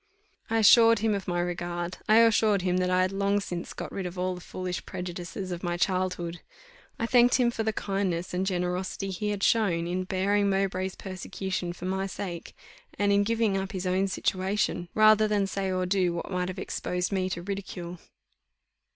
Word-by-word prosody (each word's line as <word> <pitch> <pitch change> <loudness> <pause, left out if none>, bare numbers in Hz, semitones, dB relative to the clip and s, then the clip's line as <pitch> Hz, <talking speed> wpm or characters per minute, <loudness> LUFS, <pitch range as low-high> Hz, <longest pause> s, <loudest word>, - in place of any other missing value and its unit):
I 225 - +1
assured 230 +1 +7
him 215 +1 +1
of 200 -2 -3
my 175 -1 0
regard: 175 0 -3
I 215 - +7
assured 215 -4 +4
him 180 -1 +1
that 180 0 +1
I 185 0 +3
had 185 - 0
long 200 +1 +1
since 175 -3 -5
got - - -6
rid 190 -2 -3
of 180 +1 -8
all 185 +1 0
the 180 - -8
foolish 180 0 -5
prejudices 180 +1 -6
of 175 -1 -4
my 175 -1 -2
childhood. 180 -2 -1 0.6
I 230 - -1
thanked 245 0 +5
him 245 -2 +3
for 225 - -3
the 220 0 +1
kindness 195 -4 -2
and 180 +1 0
generosity 185 +1 -2
he 210 +3 -2
had 205 -1 -2
shown 185 -7 +2
in 180 +2 -2
bearing 200 +2 +1
Mowbray's 190 -1 -1
persecution 190 -1 -4
for 175 +1 -8
my 190 +1 -1
sake, 180 -3 -6 0.4
and 205 0 +2
in 200 0 +4
giving 225 -1 +1
up 195 0 -3
his 185 -1 -4
own 185 +2 +1
situation, 190 -2 -1
rather 215 0 +6
than 205 -2 +1
say 195 -1 -2
or 185 0 0
do 180 -2 +1
what 170 - -5
might 180 -1 -1
have 185 - -5
exposed 180 +1 -3
me 185 -1 0
to 175 -2 -4
ridicule. 180 -3 -6
190 Hz, 195 wpm, -27 LUFS, 180-200 Hz, 0.6 s, assured